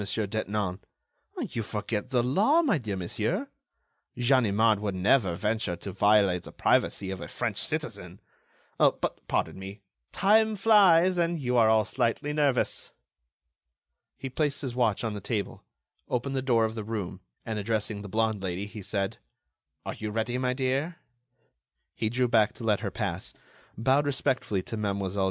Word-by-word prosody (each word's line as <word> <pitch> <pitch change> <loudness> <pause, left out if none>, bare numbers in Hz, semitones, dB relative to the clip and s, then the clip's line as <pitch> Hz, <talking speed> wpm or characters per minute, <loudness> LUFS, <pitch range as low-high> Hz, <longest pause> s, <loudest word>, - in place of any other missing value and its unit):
Detinan. 105 -2 -2 0.6
"You 115 - -3
forget 105 +1 -3
the 125 -3 +2
law, 215 - +3
my 270 - +2
dear 105 -5 -4
monsieur! 90 -2 -2 0.7
Ganimard 115 -4 +3
would 100 -2 -2
never 95 -1 +3
venture 105 -2 -1
to 90 +3 -7
violate 100 -2 +3
the - - -10
privacy 95 -1 +1
of 95 -2 -6
a - - -6
French - - -3
citizen. - - -4 0.6
But, - - +1
pardon - - -1
me, 100 +2 -8 0.3
time 220 +2 +3
flies, 185 -4 +5
and 170 0 +1
you 125 -3 -1
are 115 -2 +5
all 110 -1 +4
slightly 130 +4 -1
nervous." 145 -4 +1 1.3
He 135 - -5
placed 145 +2 -1
his 130 -3 -3
watch 120 -4 +1
on 110 -2 -2
the 105 - -6
table, 100 +1 -3 0.5
opened 135 +3 -1
the 130 - 0
door 120 -4 +3
of 110 - -3
the 110 -1 -5
room 100 -4 -5 0.2
and 110 -2 -3
addressing 105 0 -2
the 100 - -8
blonde 110 -1 0
lady 95 +1 -3
he 105 +1 -9
said: 100 0 -2 0.7
"Are - - -3
you 110 - -5
ready 115 +3 -1
my 125 0 0
dear?" 135 +6 -1 1.0
He 110 - -1
drew 125 +2 +1
back 115 -1 +3
to 120 - -11
let 105 -3 +2
her - - -3
pass, - - -4 0.4
bowed 130 +6 +2
respectfully 130 -8 0
to 115 - -6
Mlle. 100 -2 -2
110 Hz, 160 wpm, -28 LUFS, 100-130 Hz, 1.3 s, flies